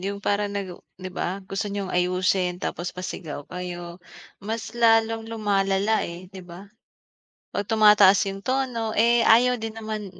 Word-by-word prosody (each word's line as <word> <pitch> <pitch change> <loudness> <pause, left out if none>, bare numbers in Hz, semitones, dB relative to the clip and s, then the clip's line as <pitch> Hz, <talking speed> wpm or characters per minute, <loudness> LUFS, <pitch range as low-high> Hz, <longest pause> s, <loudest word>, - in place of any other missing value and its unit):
yung 200 +2 -5
parang 205 +1 0
nag 195 -2 -3
u - - -13 0.2
'di 185 0 -7
ba? 190 +2 -3
Gusto 195 +2 -3
niyong 200 -2 -4
ayusin 180 0 +1
tapos 175 +1 -4
pasigaw 170 -5 -6
kayo. 175 -1 -7 0.4
Mas 220 +2 -5
lalong 225 -1 +3
lumalala, 205 -1 +1
eh, 180 +2 -10
'di 190 - -10
ba? 175 +3 -11 0.9
'Pag 205 - -3
tumataas 210 -3 +6
yung 195 0 -8
tono, 250 -4 -1
eh, 235 +1 +4
ayaw 245 +2 +5
din 225 0 -5
naman 215 -2 -5
200 Hz, 155 wpm, -24 LUFS, 185-220 Hz, 0.9 s, tumataas